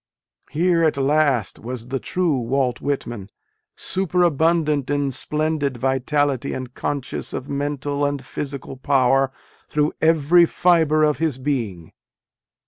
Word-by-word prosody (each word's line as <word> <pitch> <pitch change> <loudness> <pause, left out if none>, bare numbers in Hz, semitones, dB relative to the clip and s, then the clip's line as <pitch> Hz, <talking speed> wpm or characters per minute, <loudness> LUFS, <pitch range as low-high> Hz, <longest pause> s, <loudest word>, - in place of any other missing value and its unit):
Here 170 +1 +2
at 155 -3 +2
last 140 -5 +1
was 120 0 -7
the 135 0 -2
true 170 -5 0
Walt 125 +1 -1
Whitman, 120 -8 -3 0.5
superabundant 165 -5 +1
in 145 -1 0
splendid 150 0 -1
vitality 135 +1 0
and 130 -1 -6
conscious 140 -2 -4
of 130 - -5
mental 145 0 -2
and 145 -2 -1
physical 140 -1 -5
power 135 0 +2 0.4
through 150 0 +1
every 165 +2 +5
fibre 160 -4 +3
of 150 -1 +2
his 160 -5 0
being. 115 - -3
145 Hz, 120 wpm, -22 LUFS, 130-155 Hz, 0.5 s, every